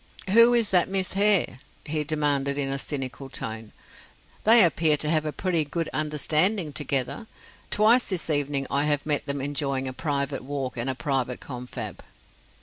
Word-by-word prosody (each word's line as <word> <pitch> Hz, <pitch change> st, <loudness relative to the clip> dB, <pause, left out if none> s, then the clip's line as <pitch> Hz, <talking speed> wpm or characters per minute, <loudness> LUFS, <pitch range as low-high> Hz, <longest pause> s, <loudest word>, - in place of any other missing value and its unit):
"Who 230 Hz, +3 st, +6 dB
is 230 Hz, -3 st, +1 dB
that 180 Hz, -1 st, +3 dB
Miss 190 Hz, -1 st, -1 dB
Hare?" 200 Hz, -9 st, +3 dB, 0.3 s
he 155 Hz, 0 st, -1 dB
demanded 145 Hz, -2 st, -1 dB
in 140 Hz, -1 st, -1 dB
a 135 Hz, -, -2 dB
cynical 135 Hz, -1 st, -5 dB
tone. 110 Hz, -3 st, -6 dB, 0.7 s
"They 225 Hz, 0 st, +8 dB
appear 160 Hz, -3 st, +3 dB
to 150 Hz, -, -1 dB
have 155 Hz, -1 st, +1 dB
a -, -, -2 dB
pretty 170 Hz, -1 st, 0 dB
good 165 Hz, +3 st, -4 dB
understanding 155 Hz, +3 st, +1 dB
together. 145 Hz, -, -2 dB, 0.4 s
Twice 225 Hz, +4 st, +3 dB
this 185 Hz, -4 st, -1 dB
evening 145 Hz, -2 st, 0 dB
I 140 Hz, +1 st, +1 dB
have 145 Hz, -1 st, 0 dB
met 150 Hz, -1 st, 0 dB
them 140 Hz, -1 st, -2 dB
enjoying 140 Hz, -1 st, -2 dB
a 130 Hz, -, -4 dB
private 140 Hz, -2 st, -3 dB
walk 135 Hz, -1 st, -4 dB
and 120 Hz, +2 st, -3 dB
a 130 Hz, -, -2 dB
private 130 Hz, 0 st, -2 dB
confab." 125 Hz, -2 st, -8 dB
145 Hz, 165 wpm, -25 LUFS, 135-170 Hz, 0.7 s, They